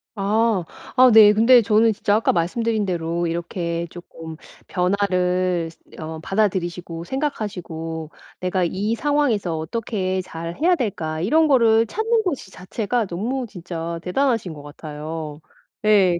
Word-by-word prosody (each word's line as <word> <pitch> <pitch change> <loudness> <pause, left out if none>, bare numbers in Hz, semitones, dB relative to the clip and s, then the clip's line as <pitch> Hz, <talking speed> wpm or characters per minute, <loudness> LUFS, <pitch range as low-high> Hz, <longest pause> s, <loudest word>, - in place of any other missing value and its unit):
아. 210 -1 +1 0.3
아 255 0 +8
네. 215 -1 +9
근데 230 +4 +6
저는 220 +1 +3
진짜 205 -1 +1
아까 220 - +2
말씀드린 215 +5 0
대로 170 -1 -1
이렇게 170 0 -3
쪼끔 165 -2 -10 0.3
변화를 180 -2 +1
쓰 - - -24 0.2
어 160 0 -6
받아들이시고 175 -3 -1
생각하시고 175 - -4 0.3
'내가 185 0 0
이 205 +6 -1
상황에서 235 - 0
어떻게 190 +2 -2
잘 170 -1 -7
해야 355 +2 +4
될까.' 165 - -3
이런 310 - +3
거를 230 -4 +5
찾는 440 - 0
것이 290 - -3
자체가 220 +5 -2
너무 235 +9 -2
진짜 170 -3 -6
대단하신 225 - 0
것 145 -2 -11
같아요. 150 +1 -7 0.5
예. 190 -5 +4
185 Hz, 285 characters per minute, -22 LUFS, 170-225 Hz, 0.5 s, 네